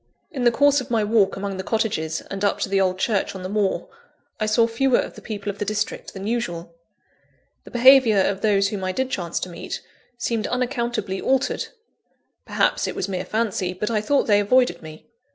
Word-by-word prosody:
In 265 -6 -3
the 240 - +6
course 285 +3 +4
of 255 - -9
my 225 -3 +1
walk 210 -2 +2
among 195 -1 -4
the 190 - -4
cottages 185 -8 -1
and 195 0 -7
up 205 - +2
to - - -1
the 195 0 +2
old 185 -1 +1
church 195 0 0
on 185 - -7
the - - -3
moor, 205 -1 0 0.5
I 215 - 0
saw 220 +2 +4
fewer 240 +3 +2
of - - -2
the - - -12
people 205 -2 -4
of 200 - -15
the - - 0
district 210 0 -3
than 195 0 -6
usual. 180 -8 -3 0.9
The - - -11
behaviour 250 -3 +6
of 195 0 +1
those 200 -2 +3
whom 200 -2 -4
I 185 0 -1
did 260 +3 -2
chance 175 -6 -2
to 185 - -4
meet, 170 - -6 0.4
seemed 230 -2 -1
unaccountably 240 -6 -2
altered; 265 0 0 0.8
perhaps - - +1
it - - -4
was 185 - -2
mere 185 -2 -3
fancy, 210 -5 -1
but 210 +5 -3
I 215 -2 +1
thought 280 +6 +2
they 205 -2 +4
avoided 205 -3 +2
me. 155 -1 -11
210 Hz, 205 wpm, -23 LUFS, 190-235 Hz, 0.9 s, the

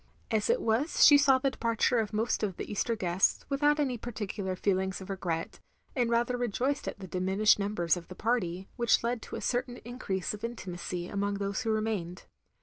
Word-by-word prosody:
As 215 -2 +1
it - - +2
was 230 +8 +3
she 290 - +9
saw 280 -2 +6
the 270 +1 0
departttre 230 0 +1
of 215 - -4
most 220 +2 0
of 195 -4 -2
the - - -4
Easter 230 +3 0
guests, 185 -2 +1
without 295 +2 +2
any 260 -5 0
particular 205 -4 -4
feelings 190 0 0
of 190 +1 -7
regret; 175 -4 -3 0.4
and 245 -3 +1
rather 235 +1 +1
rejoiced 245 +4 -1
at - - -4
the 195 - -8
diminished 190 +4 +3
numbers 200 -5 +1
of 175 -2 -8
the 185 - -9
party, 190 -5 -1
which 235 -2 +3
led 235 0 -1
to - - -7
a - - -5
certain 245 0 -1
increase 205 -7 -3
of 210 - -9
intimacy 180 -6 -5
among 200 +1 -1
those 200 +1 -2
who 230 - -2
remained. 215 -5 -2
215 Hz, 195 wpm, -30 LUFS, 190-240 Hz, 0.4 s, she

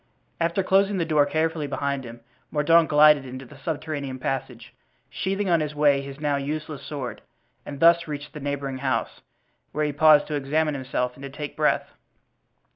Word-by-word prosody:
After 170 +3 +1
closing 195 +1 +3
the 170 - 0
door 150 -3 +3
carefully 160 0 -1
behind 140 -1 -2
him 120 0 -10 0.3
Mordaunt 160 +2 +4
glided 150 -1 +6
into 130 0 -8
the - - -15
subterranean 150 -4 -4
passage, 125 -2 -4 0.4
sheathing 195 +1 -2
on 170 -2 +3
the 150 -1 -2
way 145 -2 +3
his 140 0 -9
now 145 -1 0
useless 150 0 -4
sword, 140 -4 -6 0.5
and 140 -1 -7
thus 170 +1 +5
reached 145 -1 -6
the 150 - -7
neighboring 140 -2 -3
house, 130 -1 -2 0.5
where 150 0 0
he 150 - -2
paused 150 0 +6
to 155 - -6
examine 150 +2 0
himself 130 -2 -2
and 135 - -16
to 140 - -6
take 145 +1 -7
breath. - - +1
145 Hz, 175 wpm, -25 LUFS, 140-155 Hz, 0.5 s, glided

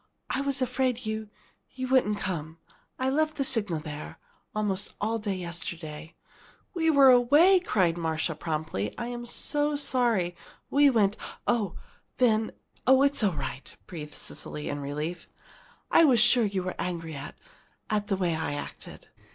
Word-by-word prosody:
"I 265 - 0
was 275 -2 0
afraid 250 -1 -1
you 220 0 -3 0.4
you 255 0 -5
wouldn't 250 -5 +3
come. 160 -5 -4 0.4
I 260 - -1
left 310 +2 +1
the 275 - +1
signal 210 - -1
there 150 0 -7 0.4
almost 205 -2 -2
all 225 +2 -1
day 205 -2 -2
yesterday 165 -3 -5 0.3
" - - -29
"We 325 -3 +1
were 280 -4 +7
away!" 295 +10 +6
cried 180 - +1
Marcia, 160 0 -1
promptly. 155 - -3
"I'm 240 0 -5
so 295 +4 +1
sorry. 235 -11 +1 0.4
We 285 0 +6
went 210 -5 +2 0.2
" - - -31
"Oh, 210 -7 +1 0.4
then 220 -3 +2 0.4
oh, 265 +1 +6
it's 280 -1 +3
all 195 -4 +3
right!" 135 -2 -6
breathed 150 -5 -8
Cecily, 150 - -3
in 145 - -3
relief. 150 +5 -4 0.6
"I - - +7
was 255 -6 +5
sure 240 0 +5
you 195 -2 -1
were 185 - -3
angry 165 -3 -3
at 140 0 -8 0.5
at 210 -2 -1
the 195 - 0
way 175 -3 0
I 160 -2 -2
acted." 145 - -8
210 Hz, 160 wpm, -28 LUFS, 165-255 Hz, 0.6 s, were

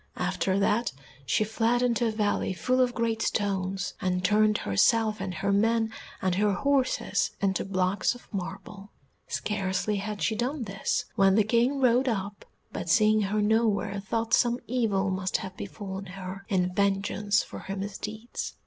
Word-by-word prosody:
After 190 0 0
that 210 +4 +1 0.3
she - - +2
fled 230 +3 +1
into 235 -1 +2
a - - 0
valley 210 -3 0
full 255 +7 +1
of 245 -1 +1
great 230 -1 0
stones, 195 -3 -1
and 180 -1 0
turned 210 +2 +4
herself 215 - +2
and 195 -1 -3
her 195 +3 -1
men 225 +2 +2 0.3
and 185 -1 +2
her 205 +2 +2
horses 255 -5 +1
into 195 -1 0
blocks 185 +3 0
of 245 - -15
marble. 195 +1 -6 0.4
Scarcely 200 0 -1
had 205 +1 -4
she 220 - +1
done 250 +4 -2
this 195 -2 -2
when 195 -1 +4
the 215 - +5
King 240 +6 +2
rode 255 0 +3
up, 205 -3 -3 0.3
but 175 - -5
seeing 215 +5 +4
her 210 +1 0
nowhere 210 -2 +1
thought 225 +3 -2
some 240 0 +4
evil 210 -6 0
must 185 0 0
have 190 -1 -7
befallen 195 -1 -6
her 190 +1 -8
in 180 -2 +1
vengeance 200 +1 +1
of - - -16
her 195 - -4
misdeeds. 210 +3 -5
205 Hz, 160 wpm, -27 LUFS, 195-225 Hz, 0.4 s, the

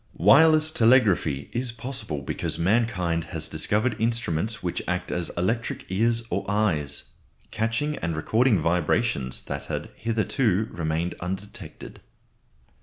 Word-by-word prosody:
Wireless 155 - +6
telegraphy 110 - +3
is 120 0 -1
possible 115 - -4
because - - -3
mankind 90 -4 +1
has - - -2
discovered 110 +2 +1
instruments 115 -3 0
which 90 - -2
act 90 0 -2
as 90 -2 -2
electric 110 +7 -1
ears 115 +4 +1
or - - -1
eyes, 80 -10 0 0.5
catching 115 +7 -1
and 85 -1 -2
recording 110 +7 +2
vibrations 85 - 0
that - - -5
had - - -5
hitherto 110 -1 0
remained 80 +1 -2
undetected. 100 +4 -7
105 Hz, 115 wpm, -25 LUFS, 85-115 Hz, 0.5 s, Wireless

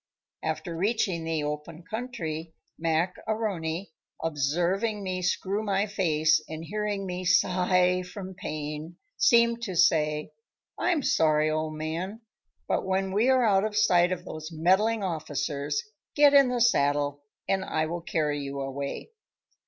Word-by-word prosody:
After 170 -3 -3
reaching 190 -2 0
the 160 -2 -1
open 150 +3 -5
country 170 -8 -5 0.2
Mac 165 +2 0
A'Rony, 195 -5 -2 0.3
observing 175 - 0
me 185 -1 -2
screw 190 +3 0
my 200 -1 +1
face 155 -6 +2
and 160 +1 -6
hearing 205 +1 -2
me 180 0 -4
sigh 180 0 +3
from 185 +1 -8
pain, 155 -1 -6 0.2
seemed 235 -2 +4
to 195 -6 -4
say: 150 -2 +2 0.4
"I'm 335 -6 +1
sorry, 155 -4 +3
old 155 0 -2
man, 170 +8 -4 0.5
but - - 0
when 190 0 0
we 215 +6 +2
are 260 -1 +4
out 195 -2 +4
of 215 -1 -2
sight 180 -4 +4
of 180 0 -3
those 155 -2 -7
meddling 190 +7 +2
officers, 145 -4 -2 0.3
get 290 -1 +6
in 275 -2 +7
the 245 -1 -1
saddle 145 -9 +2 0.3
and 190 -1 +1
I 155 -4 -1
will 170 +2 -4
carry 150 -3 -1
you 140 0 -5
a 135 0 -3
way." 140 - -5
180 Hz, 145 wpm, -27 LUFS, 155-200 Hz, 0.5 s, in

